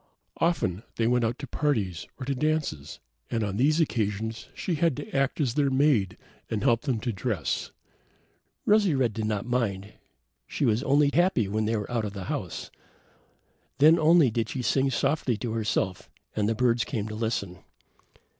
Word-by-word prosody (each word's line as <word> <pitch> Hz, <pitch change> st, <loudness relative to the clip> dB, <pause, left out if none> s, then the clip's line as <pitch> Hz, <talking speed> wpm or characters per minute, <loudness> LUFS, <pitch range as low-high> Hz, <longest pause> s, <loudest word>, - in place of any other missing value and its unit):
Often 105 Hz, -, 0 dB
they 115 Hz, -, 0 dB
went 125 Hz, +1 st, +2 dB
out 115 Hz, +2 st, 0 dB
to 145 Hz, -, -6 dB
parties, 115 Hz, -, -1 dB
or 130 Hz, -, -5 dB
to 140 Hz, -, 0 dB
dances, 135 Hz, -, -2 dB, 0.3 s
and 115 Hz, -2 st, -1 dB
on 100 Hz, -1 st, -2 dB
these 150 Hz, +6 st, +3 dB
occasions 110 Hz, -6 st, -1 dB
she 180 Hz, -, -2 dB
had 165 Hz, -3 st, +1 dB
to 145 Hz, -, -7 dB
act 135 Hz, +2 st, +1 dB
as 130 Hz, -6 st, +1 dB
their 140 Hz, 0 st, +2 dB
maid 130 Hz, -9 st, +2 dB, 0.3 s
and 110 Hz, -2 st, -2 dB
help 120 Hz, -3 st, +3 dB
them 130 Hz, -6 st, -1 dB
to 120 Hz, -, -1 dB
dress. 95 Hz, -, -2 dB, 1.0 s
Rosy 205 Hz, -6 st, +4 dB
red 125 Hz, -5 st, +1 dB
did 110 Hz, 0 st, -3 dB
not 105 Hz, 0 st, -2 dB
mind; 105 Hz, -5 st, -2 dB, 0.5 s
she -, -, -1 dB
was 115 Hz, -1 st, +2 dB
only 140 Hz, +1 st, +3 dB
happy 175 Hz, -, +3 dB
when 110 Hz, +2 st, -1 dB
they 115 Hz, +1 st, 0 dB
were 105 Hz, +3 st, -5 dB
out 115 Hz, -2 st, 0 dB
of 100 Hz, -, -5 dB
the 100 Hz, -2 st, -6 dB
house. -, -, -5 dB, 1.1 s
Then 160 Hz, +4 st, +6 dB
only 155 Hz, -4 st, +5 dB
did 110 Hz, 0 st, -1 dB
she 130 Hz, -, -3 dB
sing 135 Hz, +2 st, +2 dB
softly 130 Hz, -2 st, 0 dB
to 120 Hz, +1 st, -4 dB
herself, 105 Hz, -4 st, -1 dB, 0.3 s
and 105 Hz, 0 st, +1 dB
the 115 Hz, -, 0 dB
birds 120 Hz, -1 st, +2 dB
came 110 Hz, -5 st, -3 dB
to 110 Hz, -, -6 dB
listen. 110 Hz, -5 st, -3 dB
120 Hz, 180 wpm, -27 LUFS, 105-140 Hz, 1.1 s, Then